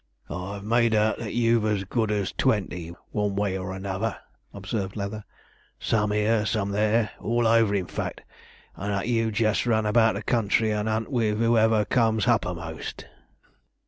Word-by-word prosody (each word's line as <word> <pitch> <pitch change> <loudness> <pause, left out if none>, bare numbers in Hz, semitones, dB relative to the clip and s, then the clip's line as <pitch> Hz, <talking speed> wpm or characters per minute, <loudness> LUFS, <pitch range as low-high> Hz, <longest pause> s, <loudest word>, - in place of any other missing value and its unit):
'I've 100 +3 -5
made 115 +1 +2
out 110 0 +2
that 110 -2 -5
you've 115 -1 +3
as 105 -2 0
good 110 +2 -1
as 100 -2 -1
twenty, 90 -8 -1 0.2
one 105 -2 -1
way 100 -1 0
or 95 0 -4
another,' 95 +3 -3 0.3
observed 100 0 -4
Leather; 105 +1 -4 0.6
'some 105 -2 +1
'ere, 105 +1 +2
some 100 -2 -1
there, 110 +2 +1
all 120 +1 0
over 115 -2 +4
in 95 -2 0
fact, - - -5 0.5
and 100 +2 -4
that 100 +2 -1
you 115 -2 +1
jest 110 +2 +1
run 110 -2 +2
about 110 0 +3
the 100 - -4
country, 110 -1 +1
and 105 +1 -1
'unt 110 +4 -2
with 110 -4 +1
'oever 110 -2 +3
comes 110 -2 +2
h'uppermost.' 90 -8 -2
105 Hz, 160 wpm, -25 LUFS, 100-115 Hz, 0.6 s, over